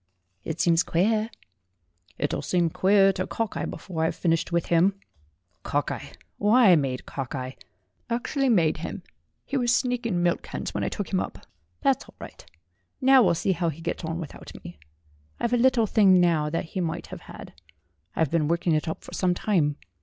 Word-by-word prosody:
"It 160 0 -5
seems 170 -4 +4
queer." 215 +6 +1 0.9
"It'll 145 - -1
seem 175 -3 +1
queerer 195 +2 +4
to 185 0 -3
Cockeye 225 -2 -3
before 165 -4 -4
I've 160 - 0
finished 165 0 0
with 170 -1 +1
him. 175 +4 +3 0.7
Cockeye? - - -3 0.3
Why, 215 0 +5
I - - +8
made 135 -4 -1
Cockeye 130 -1 -5 0.6
actually 260 +3 0
made 170 -9 +3
him! - - -6 0.4
He 275 - -2
was 240 -2 +1
sneaking 240 -7 0
milk 175 -1 +1
cans - - -6
when - - -2
I - - 0
took 205 -2 -5
him 185 - +3
up. - - -6 0.4
That's - - +1
all - - -18
right; - - -11 0.6
now 265 0 +6
we'll 180 -6 +3
see 190 - 0
how 170 -2 0
he 160 0 -7
gets 165 - -4
on 160 +1 -3
without 160 -5 -9
me. 85 - -10 0.6
I've 235 +1 -1
a - - +4
little 245 -2 +4
thing 195 -3 +5
now 165 -4 +2
that 165 +3 -2
he 185 - -1
might 170 0 -3
have - - -8
had. - - -11 0.6
I've 160 -4 +1
been 160 -3 +1
working 170 +1 +1
it 155 +1 0
up 160 - -4
for - - -11
some 180 -1 +1
time. 165 -8 +1
175 Hz, 185 wpm, -26 LUFS, 165-215 Hz, 0.9 s, I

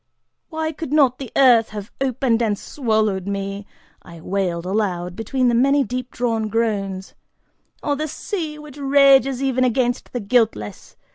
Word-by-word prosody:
"Why 315 -1 -2
could 315 -2 -7
not 275 -5 +3
the 265 -4 -7
earth 245 -5 +5
have 210 +1 -8
opened 255 -3 +1
and 210 -3 +1
swallowed 215 -8 -1
me," 200 0 -4 0.3
I 170 -2 -13
wailed 180 -1 -2
aloud, 180 -3 -2
between 250 +4 0
the 240 - +3
many 275 +4 +3
deep 250 +2 -4
drawn 225 -3 -1
groans, 200 -4 -2 0.7
"or 290 - 0
the 305 +2 -3
sea, 315 -2 -5
which 300 -2 -12
rages 275 -2 +4
even 260 -1 +1
against 245 0 0
the 245 - -3
guiltless? 210 - -1
240 Hz, 150 wpm, -21 LUFS, 200-275 Hz, 0.7 s, earth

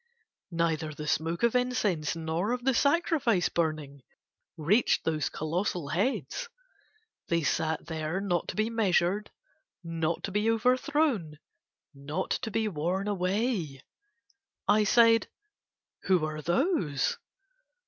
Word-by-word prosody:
Neither 160 -3 -1
the 150 - -6
smoke 165 +5 -1
of 235 - +4
incense 220 -12 0
nor 165 +7 -1
of 250 -1 -3
the 265 +1 +3
sacrifice 280 - +2
burning 155 -4 -2 0.6
reached 185 +10 +2
those 155 -3 0
colossal 165 0 -2
heads, 260 - -1 0.8
they 170 -1 +1
sat 160 +1 0
there 160 +2 -3
not 180 -4 -1
to - - -5
be 215 +2 0
measured, 200 -2 +1 0.5
not 165 -1 -2
to 195 - -3
be 210 +3 +1
over 235 +3 +3
thrown, 255 - 0 0.6
not 145 +6 -4
to - - -1
be 220 +1 0
worn 185 +3 -2
away. 185 - -1 0.8
I 210 +1 +4
said: 230 +1 +5 0.8
"Who 180 -5 +3
are 155 0 -4
those?" 175 - 0
180 Hz, 120 wpm, -29 LUFS, 160-225 Hz, 0.8 s, said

